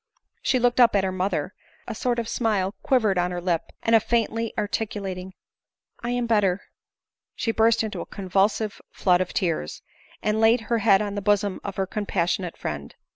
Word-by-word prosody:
She 260 Hz, -, +2 dB
looked 245 Hz, 0 st, +2 dB
up 235 Hz, -3 st, +6 dB
at 195 Hz, -, +3 dB
her 190 Hz, -, 0 dB
mother, 185 Hz, -2 st, -2 dB, 0.3 s
a 230 Hz, -, -3 dB
sort 240 Hz, +2 st, -1 dB
of 235 Hz, -1 st, -2 dB
smile 210 Hz, -6 st, 0 dB
quivered 220 Hz, -8 st, +2 dB
on 175 Hz, 0 st, +1 dB
her 180 Hz, 0 st, -3 dB
lip; 175 Hz, -2 st, 0 dB, 0.2 s
and 225 Hz, -1 st, +5 dB
faintly 230 Hz, 0 st, 0 dB
articulating, 200 Hz, -3 st, -3 dB, 0.3 s
" -, -, -52 dB
I 235 Hz, -, -2 dB
am 245 Hz, 0 st, 0 dB
better," 205 Hz, -4 st, +2 dB, 0.7 s
she 230 Hz, -, 0 dB
burst 225 Hz, 0 st, +3 dB
into 220 Hz, -, -4 dB
a -, -, -7 dB
convulsive 200 Hz, +2 st, 0 dB
flood 180 Hz, -1 st, +2 dB
of 185 Hz, -, -2 dB
tears, 165 Hz, -, -2 dB, 0.4 s
and 215 Hz, +1 st, +1 dB
laid 225 Hz, +2 st, +5 dB
her 230 Hz, +1 st, 0 dB
head 205 Hz, -2 st, +4 dB
on 205 Hz, -1 st, -4 dB
the 205 Hz, -, -3 dB
bosom 205 Hz, -1 st, +1 dB
of 200 Hz, -, -5 dB
her 195 Hz, -, 0 dB
compassionate 185 Hz, -3 st, -2 dB
friend. 70 Hz, -1 st, -5 dB
205 Hz, 180 wpm, -25 LUFS, 185-225 Hz, 0.7 s, up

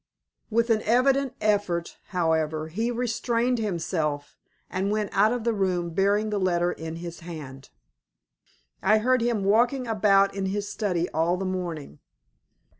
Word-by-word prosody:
With 230 Hz, +1 st, +1 dB
an 220 Hz, -1 st, +3 dB
evident 260 Hz, +3 st, +2 dB
effort, 200 Hz, -5 st, 0 dB
however, 160 Hz, -3 st, 0 dB
he 220 Hz, +8 st, -1 dB
restrained 240 Hz, 0 st, 0 dB
himself, 160 Hz, -7 st, -2 dB, 0.3 s
and 190 Hz, +2 st, -2 dB
went 210 Hz, -1 st, -1 dB
out 210 Hz, +3 st, +4 dB
of 245 Hz, -2 st, -2 dB
the 235 Hz, 0 st, +1 dB
room 180 Hz, -4 st, -1 dB
bearing 205 Hz, +4 st, +1 dB
the 205 Hz, -, 0 dB
letter 175 Hz, -2 st, +1 dB
in 160 Hz, 0 st, -6 dB
his 170 Hz, 0 st, -7 dB
hand. 150 Hz, -6 st, -9 dB, 1.1 s
I 215 Hz, +3 st, +4 dB
heard 255 Hz, +3 st, +2 dB
him 230 Hz, -4 st, 0 dB
walking 240 Hz, +6 st, +2 dB
about 200 Hz, -3 st, +3 dB
in 195 Hz, -1 st, -2 dB
his 205 Hz, +1 st, -2 dB
study 180 Hz, -6 st, -1 dB
all 165 Hz, +3 st, +1 dB
the 190 Hz, -, -3 dB
morning. 170 Hz, -, -4 dB
195 Hz, 145 wpm, -26 LUFS, 170-225 Hz, 1.1 s, out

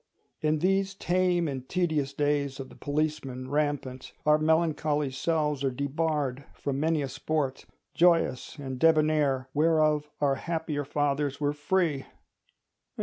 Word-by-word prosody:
In 155 Hz, 0 st, +2 dB
these 195 Hz, +4 st, +1 dB
tame 180 Hz, -2 st, +1 dB
and 130 Hz, -3 st, -5 dB
tedious 160 Hz, -6 st, 0 dB
days 145 Hz, -1 st, 0 dB
of 135 Hz, -, -6 dB
the -, -, -14 dB
policeman 145 Hz, -4 st, -3 dB
rampant, 145 Hz, -3 st, -2 dB
our 150 Hz, 0 st, +5 dB
melancholy 155 Hz, -2 st, +1 dB
selves 150 Hz, +1 st, 0 dB
are 135 Hz, -, +2 dB
debarred 140 Hz, 0 st, -1 dB
from 140 Hz, -1 st, -3 dB
many 155 Hz, -1 st, +1 dB
a -, -, -2 dB
sport, 140 Hz, -1 st, -2 dB, 0.3 s
joyous 165 Hz, -6 st, +2 dB
and 130 Hz, -3 st, -6 dB
debonair, 155 Hz, -4 st, +3 dB
whereof 155 Hz, -1 st, +2 dB
our 140 Hz, -2 st, +3 dB
happier 160 Hz, -4 st, -2 dB
fathers 145 Hz, -1 st, -1 dB
were 145 Hz, 0 st, +1 dB
free. 150 Hz, -2 st, 0 dB
150 Hz, 130 wpm, -28 LUFS, 140-160 Hz, 0.3 s, our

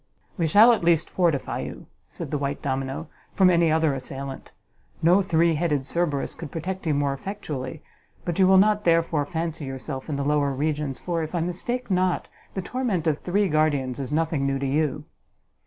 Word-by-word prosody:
"We 165 Hz, -3 st, 0 dB
shall, 215 Hz, +9 st, +7 dB
at 220 Hz, -, -1 dB
least, 170 Hz, -1 st, +2 dB
fortify 165 Hz, -7 st, 0 dB
you," -, -, -7 dB, 0.2 s
said -, -, -7 dB
the 150 Hz, -, -1 dB
white 140 Hz, 0 st, -3 dB
domino, 135 Hz, +3 st, -2 dB, 0.3 s
"from 185 Hz, -2 st, +5 dB
any 170 Hz, -2 st, +3 dB
other 160 Hz, -2 st, +2 dB
assailant: 135 Hz, 0 st, -6 dB, 0.5 s
no 180 Hz, +4 st, +5 dB
three 170 Hz, -3 st, +2 dB
headed 150 Hz, -3 st, 0 dB
Cerberus 150 Hz, -1 st, -1 dB
could 165 Hz, -3 st, -8 dB
protect 180 Hz, +3 st, -4 dB
you 150 Hz, -, +2 dB
more 140 Hz, -1 st, +1 dB
effectually: 150 Hz, -4 st, -6 dB, 0.4 s
but 175 Hz, +1 st, -2 dB
you 190 Hz, -, +6 dB
will 190 Hz, 0 st, +6 dB
not, 210 Hz, +1 st, +4 dB
therefore, 165 Hz, -3 st, +2 dB
fancy 165 Hz, -2 st, -3 dB
yourself 135 Hz, +1 st, -6 dB
in 150 Hz, -, -1 dB
the 140 Hz, 0 st, -2 dB
lower 145 Hz, -1 st, +2 dB
regions, 145 Hz, -1 st, -2 dB
for, 170 Hz, -2 st, -2 dB
if 160 Hz, +2 st, -4 dB
I -, -, +1 dB
mistake 195 Hz, +8 st, -3 dB
not, 185 Hz, -1 st, +1 dB, 0.3 s
the 190 Hz, -, -2 dB
torment 225 Hz, -8 st, -1 dB
of 155 Hz, -2 st, +1 dB
three 200 Hz, +3 st, +1 dB
guardians 145 Hz, -5 st, +1 dB
is 135 Hz, 0 st, -4 dB
nothing 155 Hz, -2 st, 0 dB
new 135 Hz, 0 st, 0 dB
to 135 Hz, -, -3 dB
you." 150 Hz, +1 st, 0 dB
160 Hz, 190 wpm, -25 LUFS, 140-175 Hz, 0.5 s, shall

